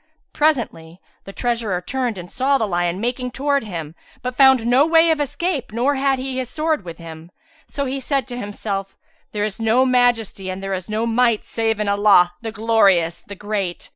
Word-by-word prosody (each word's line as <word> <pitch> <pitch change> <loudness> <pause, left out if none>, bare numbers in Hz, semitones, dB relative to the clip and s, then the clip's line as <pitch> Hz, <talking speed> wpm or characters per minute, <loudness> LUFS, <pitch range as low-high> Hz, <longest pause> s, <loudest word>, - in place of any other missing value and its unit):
Presentry 230 - -1 0.3
the 195 - -8
treasurer 230 -4 -1
turned 245 +3 -3
and 175 -1 -9
saw 275 +2 +2
the 225 - 0
lion 175 -1 -1
making 245 +3 -2
towards 275 -1 -1
him; 165 -5 -6 0.3
but 250 0 -3
found 265 -3 +5
no 250 +4 +4
way 325 +1 +4
of 310 -2 0
escape 290 -1 -2
nor 245 +6 +1
had 270 0 +1
he 260 0 -4
his 255 -2 -4
sword 310 -3 -1
with 170 -2 -8
him. 165 0 -11 0.4
So 280 - -3
he 270 +1 -3
said 265 -2 -2
in 245 - -5
himself, 200 -2 -5 0.3
"There 205 -1 -2
is 210 0 -3
no 225 +3 +3
Majesty 245 -6 +1
and 185 +1 -5
there 195 0 -3
is 185 0 -5
no 215 +2 -1
Might 235 -1 +2
save 225 -1 -1
in 210 - -1
Allah, 200 -3 +4
the 225 -1 -5
Glorious, 200 -7 +2
the 200 - -8
Great! 200 -3 -4
225 Hz, 195 wpm, -20 LUFS, 195-260 Hz, 0.4 s, found